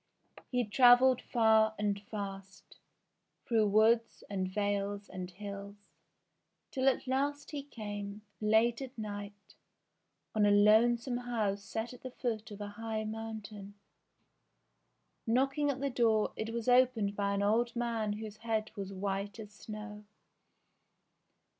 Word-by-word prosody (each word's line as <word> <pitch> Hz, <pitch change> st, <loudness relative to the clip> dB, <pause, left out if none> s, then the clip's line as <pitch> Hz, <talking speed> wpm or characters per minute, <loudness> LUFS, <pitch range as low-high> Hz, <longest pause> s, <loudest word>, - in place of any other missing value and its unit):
He 250 Hz, -2 st, 0 dB
travelled 245 Hz, +3 st, +6 dB
far 220 Hz, -2 st, +3 dB
and 205 Hz, -1 st, -1 dB
fast, 195 Hz, -2 st, -8 dB, 0.7 s
through 225 Hz, -4 st, +3 dB
woods, 220 Hz, +3 st, +3 dB
and 190 Hz, -2 st, -1 dB
vales, 200 Hz, 0 st, -1 dB
and 185 Hz, -1 st, -6 dB
hills, 200 Hz, +1 st, -8 dB, 1.0 s
till 265 Hz, 0 st, +3 dB
at 260 Hz, -, -2 dB
last 285 Hz, +3 st, -1 dB
he 290 Hz, -2 st, -3 dB
came, 205 Hz, -6 st, -7 dB, 0.2 s
late 220 Hz, +3 st, +3 dB
at 265 Hz, -1 st, -8 dB
night, 205 Hz, -2 st, -7 dB, 0.8 s
on 215 Hz, -2 st, +2 dB
a -, -, +5 dB
lonesome 235 Hz, +4 st, +4 dB
house 220 Hz, -5 st, -1 dB
set 225 Hz, +4 st, -4 dB
at 250 Hz, -, -13 dB
the 255 Hz, -, -6 dB
foot 230 Hz, -3 st, -3 dB
of 205 Hz, -1 st, -9 dB
a 205 Hz, -, -4 dB
high 220 Hz, +1 st, -4 dB
mountain. 215 Hz, -2 st, -7 dB, 1.5 s
Knocking 275 Hz, +5 st, +2 dB
at 270 Hz, -1 st, -2 dB
the 280 Hz, -1 st, 0 dB
door, 225 Hz, -3 st, +2 dB
it 220 Hz, +1 st, -4 dB
was 230 Hz, 0 st, -4 dB
opened 245 Hz, -5 st, +3 dB
by 200 Hz, 0 st, 0 dB
an 200 Hz, -, 0 dB
old 235 Hz, +4 st, +2 dB
man 230 Hz, -3 st, -1 dB
whose 215 Hz, 0 st, -7 dB
head 220 Hz, -1 st, -2 dB
was 200 Hz, -2 st, -5 dB
white 195 Hz, +1 st, -3 dB
as 210 Hz, -1 st, -8 dB
snow. 210 Hz, 0 st, -8 dB
215 Hz, 135 wpm, -32 LUFS, 205-240 Hz, 1.5 s, travelled